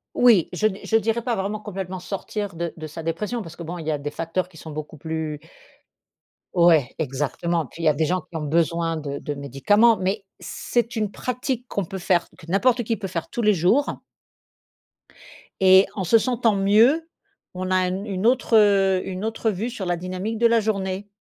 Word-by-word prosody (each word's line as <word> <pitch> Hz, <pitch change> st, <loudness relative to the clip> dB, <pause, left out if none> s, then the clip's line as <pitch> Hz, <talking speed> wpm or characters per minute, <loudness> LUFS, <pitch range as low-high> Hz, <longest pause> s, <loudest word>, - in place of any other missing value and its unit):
Oui, 230 Hz, -9 st, +5 dB
je 215 Hz, +4 st, +2 dB
di 195 Hz, -2 st, -5 dB
je 225 Hz, -, 0 dB
dirais 225 Hz, +2 st, +2 dB
pas 235 Hz, -1 st, -1 dB
vraiment 205 Hz, +2 st, -2 dB
complètement 190 Hz, -3 st, -6 dB
sortir 200 Hz, 0 st, -5 dB
de 170 Hz, 0 st, -3 dB
de 155 Hz, -1 st, -6 dB
sa 165 Hz, +2 st, -8 dB
dépression 210 Hz, +9 st, -2 dB
parce 170 Hz, -4 st, -10 dB
que 170 Hz, -, -7 dB
bon 170 Hz, +2 st, -6 dB
il 160 Hz, -, -7 dB
y 155 Hz, -, 0 dB
a 150 Hz, -, 0 dB
des 145 Hz, +1 st, -5 dB
facteurs 165 Hz, +3 st, -2 dB
qui 185 Hz, -, -22 dB
sont 160 Hz, 0 st, -9 dB
beaucoup 155 Hz, +1 st, -7 dB
plus 160 Hz, -1 st, -4 dB, 1.1 s
Ouais, 170 Hz, -7 st, +4 dB
exactement, 150 Hz, +4 st, -1 dB
puis 165 Hz, +6 st, -10 dB
il -, -, 0 dB
y -, -, +6 dB
a 150 Hz, -, +3 dB
des 160 Hz, +2 st, 0 dB
gens 185 Hz, +3 st, 0 dB
qui 170 Hz, -, -17 dB
ont -, -, -4 dB
besoin 165 Hz, +2 st, +1 dB
de 140 Hz, -2 st, -5 dB
de 145 Hz, -, -4 dB
médicaments 145 Hz, -, +3 dB
mais 195 Hz, +2 st, -1 dB, 0.2 s
c'est 235 Hz, -1 st, -2 dB
une 210 Hz, -2 st, -1 dB
pratique 250 Hz, 0 st, -3 dB
qu'on 200 Hz, -, -2 dB
peut 190 Hz, -, -6 dB
faire, 175 Hz, -1 st, +1 dB
que 160 Hz, -, -14 dB
n'importe 240 Hz, +6 st, +2 dB
qui 225 Hz, +1 st, -1 dB
peut 195 Hz, -3 st, -5 dB
faire 170 Hz, -3 st, -4 dB
tous 240 Hz, -, -3 dB
les 210 Hz, -2 st, +4 dB
jours 190 Hz, -, +2 dB, 1.6 s
et 190 Hz, 0 st, +7 dB
en 195 Hz, -, -2 dB
se 185 Hz, +6 st, +5 dB
sentant 230 Hz, -2 st, +1 dB
mieux, 230 Hz, +12 st, +4 dB, 0.4 s
on 185 Hz, 0 st, -4 dB
a -, -, +3 dB
un 185 Hz, +1 st, -1 dB
une 195 Hz, -1 st, -3 dB
autre 245 Hz, -2 st, +3 dB, 0.5 s
une 190 Hz, +1 st, -5 dB
autre 225 Hz, 0 st, -1 dB
vue 215 Hz, +5 st, -3 dB
sur 220 Hz, -6 st, -5 dB
la 175 Hz, 0 st, 0 dB
dynamique 185 Hz, +5 st, -4 dB
de 235 Hz, +1 st, +5 dB
la 230 Hz, 0 st, +4 dB
journée. 195 Hz, -2 st, -2 dB
185 Hz, 205 wpm, -23 LUFS, 165-220 Hz, 1.6 s, et